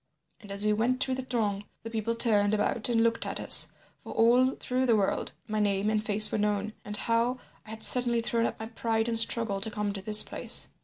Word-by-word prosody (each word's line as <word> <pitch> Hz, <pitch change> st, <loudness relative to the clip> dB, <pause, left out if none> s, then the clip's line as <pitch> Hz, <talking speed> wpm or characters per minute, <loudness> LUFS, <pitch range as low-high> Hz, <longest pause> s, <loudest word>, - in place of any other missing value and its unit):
And 205 Hz, -2 st, -13 dB
as 200 Hz, +1 st, -2 dB
we 210 Hz, -, +2 dB
went 240 Hz, +4 st, -1 dB
through 260 Hz, -, -1 dB
the 260 Hz, -, -3 dB
throng 220 Hz, -6 st, -3 dB, 0.2 s
the 225 Hz, -, -8 dB
people 230 Hz, +1 st, -3 dB
turned 215 Hz, -3 st, +3 dB
about 215 Hz, +2 st, -1 dB
and 230 Hz, -1 st, +1 dB
looked 230 Hz, 0 st, 0 dB
at -, -, -5 dB
us, -, -, +5 dB, 0.3 s
for -, -, -12 dB
all 250 Hz, +3 st, +3 dB
through 255 Hz, +1 st, -3 dB
the 230 Hz, -, +3 dB
world 200 Hz, -2 st, -2 dB, 0.2 s
my 215 Hz, -1 st, -3 dB
name 205 Hz, 0 st, 0 dB
and 215 Hz, -1 st, -1 dB
face 210 Hz, 0 st, +4 dB
were -, -, -2 dB
known, 210 Hz, +1 st, -2 dB
and 210 Hz, 0 st, -3 dB
how 235 Hz, +3 st, -1 dB, 0.3 s
I -, -, -12 dB
had 220 Hz, 0 st, -6 dB
suddenly 240 Hz, -2 st, +5 dB
thrown 230 Hz, 0 st, -1 dB
up -, -, -8 dB
pride 225 Hz, 0 st, -2 dB
and 230 Hz, -1 st, +3 dB
struggle 225 Hz, -3 st, +2 dB
to 220 Hz, -, 0 dB
come 210 Hz, -1 st, -4 dB
to 195 Hz, -, -6 dB
this 210 Hz, +2 st, +4 dB
place. -, -, -1 dB
220 Hz, 225 wpm, -27 LUFS, 210-235 Hz, 0.3 s, us